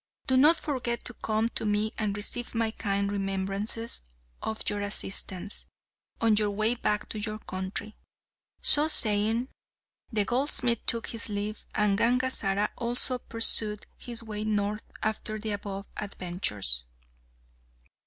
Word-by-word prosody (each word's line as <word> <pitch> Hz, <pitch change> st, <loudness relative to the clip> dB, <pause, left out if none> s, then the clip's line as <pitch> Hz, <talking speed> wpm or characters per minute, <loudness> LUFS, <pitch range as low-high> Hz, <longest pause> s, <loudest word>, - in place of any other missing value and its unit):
Do 260 Hz, -, +1 dB
not 300 Hz, +6 st, +6 dB
forget 245 Hz, -5 st, -3 dB
to 245 Hz, -, 0 dB
come 220 Hz, 0 st, -1 dB
to -, -, -1 dB
me 210 Hz, 0 st, 0 dB
and 205 Hz, -2 st, -3 dB
receive 240 Hz, +4 st, -2 dB
my 225 Hz, -1 st, 0 dB
kind 200 Hz, -2 st, -2 dB
remembrances 195 Hz, +3 st, -2 dB, 0.4 s
of 220 Hz, 0 st, -4 dB
your 205 Hz, 0 st, 0 dB
assistance, 200 Hz, -1 st, -2 dB, 0.5 s
on 225 Hz, -2 st, +2 dB
your 210 Hz, -1 st, +2 dB
way 215 Hz, +3 st, +1 dB
back 210 Hz, -3 st, -2 dB
to 215 Hz, -, -4 dB
your 215 Hz, 0 st, -3 dB
country." 195 Hz, +1 st, -6 dB, 0.7 s
So 295 Hz, +1 st, +10 dB
saying, 225 Hz, -2 st, +3 dB, 0.6 s
the 210 Hz, -3 st, 0 dB
goldsmith 245 Hz, -1 st, +2 dB
took 230 Hz, -1 st, +4 dB
his 230 Hz, -1 st, -4 dB
leave, 210 Hz, +1 st, -5 dB
and 210 Hz, -1 st, +1 dB
Gangazara 230 Hz, -4 st, +1 dB
also 245 Hz, +2 st, 0 dB
pursued 220 Hz, -2 st, +4 dB
his 235 Hz, -1 st, -4 dB
way 210 Hz, -1 st, -5 dB
north 210 Hz, 0 st, -2 dB, 0.2 s
after 215 Hz, 0 st, -3 dB
the 215 Hz, 0 st, -5 dB
above 200 Hz, -1 st, -6 dB
adventures. 175 Hz, -, -2 dB
215 Hz, 135 wpm, -27 LUFS, 205-230 Hz, 0.7 s, So